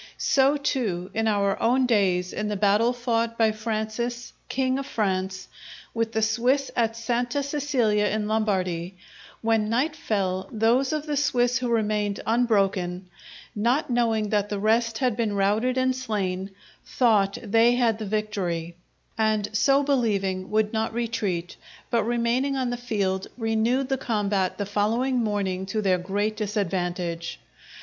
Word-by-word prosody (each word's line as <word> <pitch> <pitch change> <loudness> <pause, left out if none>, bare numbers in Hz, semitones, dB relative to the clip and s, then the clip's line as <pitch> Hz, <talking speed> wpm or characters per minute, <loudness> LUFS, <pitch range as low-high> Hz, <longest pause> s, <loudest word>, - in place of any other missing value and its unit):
So 275 +2 +3
too, 220 -11 -2
in 225 0 0
our 200 -2 +1
own 255 +3 +3
days, 185 -6 +1
in 210 - -2
the 210 - -2
battle 205 +4 +3
fought 230 -2 -1
by 225 -1 +4
Francis, 220 +2 -3 0.2
king 260 0 0
of 275 - -5
France, 190 -5 -2 0.5
with 230 -1 -1
the 220 - +1
Swiss 245 +5 +1
at 230 -1 0
Santa 245 +4 -1
Cecilia 260 -8 +1
in 210 0 -1
Lombardy, 185 -5 -1 0.5
when 220 -1 +2
night 270 +7 +1
fell, 190 - -2
those 235 +4 +2
of 305 -1 -2
the 300 -1 -2
Swiss 245 -4 +2
who 250 - -2
remained 210 -3 0
unbroken, 195 -6 +1 0.5
not 240 +6 +1
knowing 225 -3 +1
that 205 -1 0
the 205 - -2
rest 225 +2 +1
had 250 -3 +1
been 225 -3 -1
routed 210 +6 +1
and 260 0 +2
slain, 195 -6 -2 0.3
thought 210 -6 +2
they 230 +3 +4
had 230 -3 +2
the 215 - -4
victory; 190 -6 -2 0.4
and 215 -1 +1
so 275 +5 +4
believing 200 -9 0
would 215 0 +1
not 220 0 -1
retreat, 215 -7 -2 0.3
but, 235 - +3
remaining 240 +4 0
on 255 -2 -1
the - - -1
field, 200 -6 -2
renewed 230 +3 +1
the 270 -1 -1
combat 200 -5 0
the 205 - -2
following 225 +6 0
morning 195 -3 -1
to 215 +3 -2
their 190 -3 +2
great 205 +4 -1
disadvantage. 180 -5 -2
220 Hz, 150 wpm, -25 LUFS, 200-240 Hz, 0.5 s, by